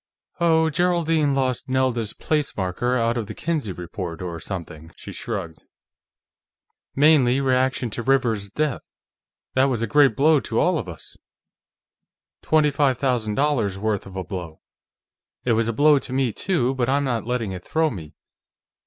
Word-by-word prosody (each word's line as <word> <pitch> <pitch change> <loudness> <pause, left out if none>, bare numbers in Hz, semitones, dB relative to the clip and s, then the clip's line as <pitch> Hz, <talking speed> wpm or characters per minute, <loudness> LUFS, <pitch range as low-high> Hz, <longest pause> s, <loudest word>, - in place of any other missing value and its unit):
"Oh, 160 -1 +3
Geraldine 165 -3 +1
lost 130 -1 -1
Nelda's 130 -4 0
place 150 -2 -2
marker 105 +7 -1
out 115 0 +1
of 110 - -5
the - - -7
Kinsey 155 - -2
Report, 85 -1 -6
or 85 -2 -5
something." 80 -4 -7
She - - -10
shrugged. 95 -8 -5 1.3
"Mainly 140 -3 +4
reaction 130 -2 +1
to 120 - -4
Rivers's 115 -6 +1
death. 150 +4 -1 0.7
That 130 +1 +4
was 125 -4 0
a - - +2
great 135 +1 +4
blow 150 +1 +4
to 115 -3 -2
all 180 -2 +2
of 95 - -6
us; 85 - -11 1.2
twenty 155 -2 +3
five 140 -3 +2
thousand 120 -6 0
dollars' 120 -9 +1
worth 105 -1 -2
of 95 - -11
blow. 85 -5 -7 0.8
It 120 - +3
was 115 0 +1
a - - +1
blow 145 +5 +4
to 135 - -8
me, 130 -4 +1
too, 135 - 0
but 130 -2 -1
I'm 140 +1 +2
not 120 -4 -2
letting 120 -5 -1
it 90 -1 -7
throw 160 -1 0
me.... 80 - -9
125 Hz, 160 wpm, -23 LUFS, 105-145 Hz, 1.3 s, Mainly